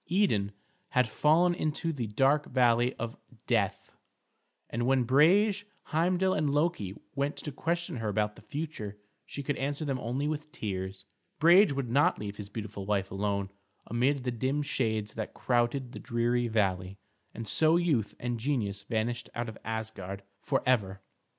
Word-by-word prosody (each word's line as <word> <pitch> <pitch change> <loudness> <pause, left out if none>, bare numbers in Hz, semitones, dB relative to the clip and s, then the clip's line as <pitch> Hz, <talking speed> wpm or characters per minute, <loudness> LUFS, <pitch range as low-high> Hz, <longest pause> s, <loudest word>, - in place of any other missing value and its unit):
Idun 140 - +2 0.4
had 125 -2 +3
fallen 160 +10 +4
into 160 0 -1
the 125 -6 -3
dark 135 +7 +2
valley 120 -1 +3
of 120 -1 -4 0.3
death, 105 -6 0 0.7
and 120 +1 -2
when 130 -1 +4
Brage, 190 - +4 0.3
Heimdal, 180 +4 +2
and 155 -1 +1
Loki 145 - 0 0.2
went 140 +1 -1
to 150 - -5
question 170 +1 -2
her 110 -2 -2
about 105 0 0
the - - -14
future 140 -10 -5 0.3
she 140 - -6
could 145 +1 -1
answer 145 +3 -2
them 135 -3 -1
only 130 +5 -2
with 150 0 -3
tears. 95 -3 -4 0.3
Brage 175 +4 +7
would 135 -4 -2
not 140 +4 +4
leave 105 -1 -6
his 100 -1 -7
beautiful 105 -2 -6
wife 100 -2 0
alone 100 0 -1 0.3
amid 130 +3 +1
the 125 - -1
dim 130 +5 0
shades 110 -6 -1
that 110 -1 -5
crowded 120 +1 0
the - - -8
dreary 120 +1 0
valley, 95 -4 0 0.4
and 115 0 -6
so 160 +7 +4
youth 150 - +1
and 120 -1 -2
genius 110 -6 -1
vanished 115 +3 -2
out 120 0 -2
of 110 - -9
Asgard 110 -4 -5 0.2
forever. 120 -8 +1
120 Hz, 155 wpm, -30 LUFS, 105-145 Hz, 0.7 s, Brage